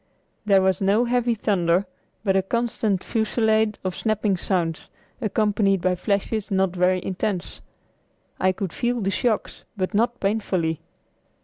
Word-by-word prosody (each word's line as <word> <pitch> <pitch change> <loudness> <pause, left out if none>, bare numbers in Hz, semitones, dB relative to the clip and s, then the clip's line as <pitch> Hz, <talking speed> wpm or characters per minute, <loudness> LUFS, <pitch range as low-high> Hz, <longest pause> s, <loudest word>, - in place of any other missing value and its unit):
There 195 -2 +5
was 190 +1 +1
no 205 +5 +3
heavy 240 -1 +1
thunder, 185 -3 +1 0.4
but 195 -3 +2
a 190 - +4
constant 220 -2 -1
fusillade 220 -1 +1
of 185 -2 -2
snapping 215 -2 0
sounds, 175 -3 -1 0.3
accompanied 210 -2 +1
by 185 +1 +2
flashes 200 +3 -1
not 190 -2 +1
very 180 0 +2
intense. 185 -1 -3 0.8
I 185 - +3
could 185 -2 -4
feel 240 -1 -1
the 195 0 0
shocks, 215 +3 -1
but 185 +2 -2
not 235 +3 +1
painfully. 185 -6 -1
200 Hz, 135 wpm, -23 LUFS, 185-220 Hz, 0.8 s, There